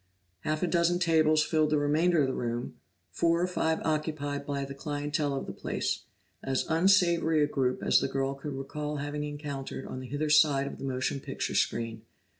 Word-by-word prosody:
Half 155 - -2
a - - +2
dozen 170 0 +2
tables 155 -3 +3
filled 155 -2 +2
the 150 - +2
remainder 155 +3 +3
of - - +1
the 130 - -1
room; 120 0 -4 0.3
four 165 - +2
or 175 - +2
five 160 -3 0
occupied 150 -2 -2
by 140 -1 -2
the 140 - -7
clientele 145 0 -2
of 135 - -3
the - - -6
place, - - -3 0.4
as 135 -1 -1
unsavory 170 -2 +4
a - - +2
group 130 -3 -1
as - - +5
the - - 0
girl 135 0 -1
could 140 +1 -6
recall 150 +2 -4
having 145 +1 -3
encountered 145 -3 -5
on 130 - -6
the 130 - -7
hither 150 +3 -1
side 150 -3 +5
of - - -7
the - - -5
motion 130 +1 -1
picture - - -4
screen. 115 -1 0
145 Hz, 195 wpm, -29 LUFS, 135-160 Hz, 0.4 s, as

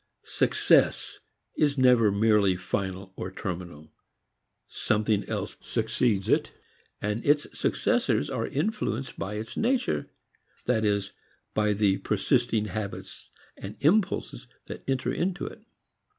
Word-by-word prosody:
"Success" - - +2 0.4
is 145 -2 +2
never 125 -5 +5
merely 100 -2 +3
final 95 +1 -4
or 95 - -5
terminal. 85 -5 -6 0.8
Something 105 -1 0
else - - -3
succeeds 105 -6 0
it, - - +2 0.5
and 105 +2 -2
its 145 +1 +3
successors - - +1
are - - -2
influenced 160 -3 -2
by 105 - -3
its 110 +2 -5
nature, 230 - 0 0.6
that 115 -3 +1
is 100 -2 0 0.4
by 105 -1 +2
the 100 -1 +2
persisting 115 +1 +1
habits 105 -2 -6 0.3
and 100 +2 -8
impulses 180 +7 +1 0.2
that - - -8
enter 130 -1 0
into 185 +1 -1
it. - - -8
105 Hz, 115 wpm, -27 LUFS, 100-130 Hz, 0.8 s, never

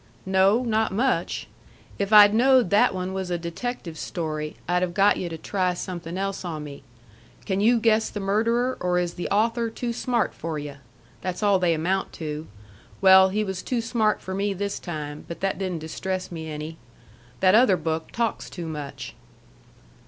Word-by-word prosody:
"No. 190 +5 +3
Not 220 -3 +1
much. 250 +7 0 0.5
If 200 +1 -1
I'd 205 -1 +9
knowed 250 -3 +4
that 200 -1 +4
one 185 0 -3
was 190 -1 -3
a 175 - 0
detective 170 0 -5
story, 155 -3 -4
I'd 180 +1 +1
have 175 -1 -2
got 200 +1 +4
yu' 175 - -3
to 165 - -6
try 185 +1 -1
something 175 -1 -5
else 195 0 -3
on 160 -4 -4
me. 145 -1 -9 0.6
Can 190 -2 -1
you 235 +3 +4
guess 220 -1 +2
the 205 - -5
murderer, 230 +6 +1
or 180 0 0
is 175 -1 -1
the 175 - -4
author 230 +3 +1
too 235 +1 -4
smart 240 0 0
for 160 -1 -4
yu'? 145 -1 -6 0.4
That's 185 +3 -4
all 200 -2 +4
they 175 -2 +2
amount 185 +5 -1
to. 155 -1 -5 0.5
Well, 190 0 +7
he 210 +3 0
was 190 -2 -4
too 250 - -2
smart 225 -2 0
for 190 - -5
me 200 +1 0
this 200 +1 -3
time, 150 -4 -6
but 170 - -7
that 195 0 -1
didn't 185 -3 -2
distress 185 +4 -4
me 160 -2 -6
any. 155 +2 -6 0.6
That 185 0 +4
other 220 -4 +5
book 160 0 -3
talks 230 -1 -2
too 175 -2 -7
much." 150 -3 -6
190 Hz, 180 wpm, -25 LUFS, 170-215 Hz, 0.6 s, I'd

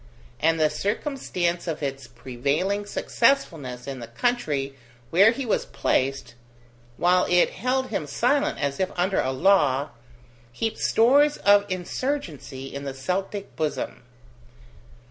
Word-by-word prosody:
And 165 +1 +2
the 155 -1 +3
circumstance 190 - -2
of 155 -2 -3
its 135 -2 -4
prevailing 145 +14 -2
successfulness 165 - 0
in 135 -2 -5
the 120 - -7
country 140 - -1 0.4
where 195 +6 +7
he 260 +3 -2
was 220 - 0
placed, 130 -2 -1 0.6
while 180 +1 +3
it 180 0 +4
held 255 +4 -1
him 160 -8 -3
silent 280 - +1
as 140 -1 -2
if 190 -1 +1
under 185 +2 +1
a 130 - -1
law, 145 -3 +3 0.6
heaped 220 - -3
stores 285 +6 +4
of 205 0 +4
insurgency 165 - -4
in 140 0 -5
the 135 -1 -5
Celtic 190 +8 -3
bosom. 155 -2 -3
175 Hz, 125 wpm, -25 LUFS, 135-205 Hz, 0.6 s, where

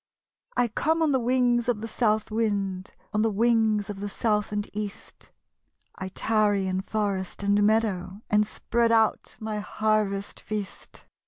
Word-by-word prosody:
1 245 -1 +2
come 320 +8 +1
on 310 - +3
the 265 - +3
wings 245 -1 +2
of 220 -3 0
the 225 - -4
South 215 -1 0
wind; 200 -4 -1 0.2
On 210 - +2
the 225 - +3
wings 220 -1 +2
of 205 -2 -6
the 205 +1 -4
South 210 0 0
and 205 0 -2
East; 210 -1 -7 0.6
I 190 - -6
tarry 205 -1 +1
in 185 0 -1
forest 200 -2 -2
and 200 +1 +3
meadow, 205 -2 +1
And 210 0 +3
spread 235 +1 0
out 225 -1 +2
my 215 -1 -3
harvest 210 -2 -1
feast. 210 -3 -7
215 Hz, 155 wpm, -26 LUFS, 200-225 Hz, 0.6 s, on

